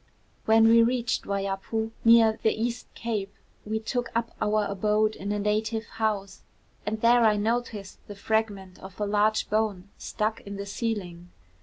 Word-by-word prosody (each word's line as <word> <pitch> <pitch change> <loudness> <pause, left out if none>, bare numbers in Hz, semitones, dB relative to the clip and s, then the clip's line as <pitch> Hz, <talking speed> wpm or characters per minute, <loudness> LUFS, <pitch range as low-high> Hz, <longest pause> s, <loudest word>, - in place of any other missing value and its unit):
When 225 0 +5
we 230 +1 +7
reached 235 0 0
Waiapu, 200 +3 -2
near 230 -1 +6
the 220 0 +1
East 235 +1 -2
Cape, 210 -4 -3 0.4
we 220 +1 -1
took 245 +2 -3
up 230 0 -1
our 210 0 +1
abode 210 +2 +1
in 200 +2 -5
a 210 - 0
native 215 +2 -1
house, 200 -3 -3 0.5
and 215 +1 -2
there 240 +1 +5
I 215 -2 +4
noticed 220 -2 -2
the 205 - -8
fragment 200 -3 -2
of 190 +1 -12
a 210 - 0
large 210 +1 +1
bone 210 -3 -1
stuck 215 +1 -2
in 200 0 -8
the 200 0 -5
ceiling. 195 -5 -4
215 Hz, 160 wpm, -26 LUFS, 200-225 Hz, 0.5 s, we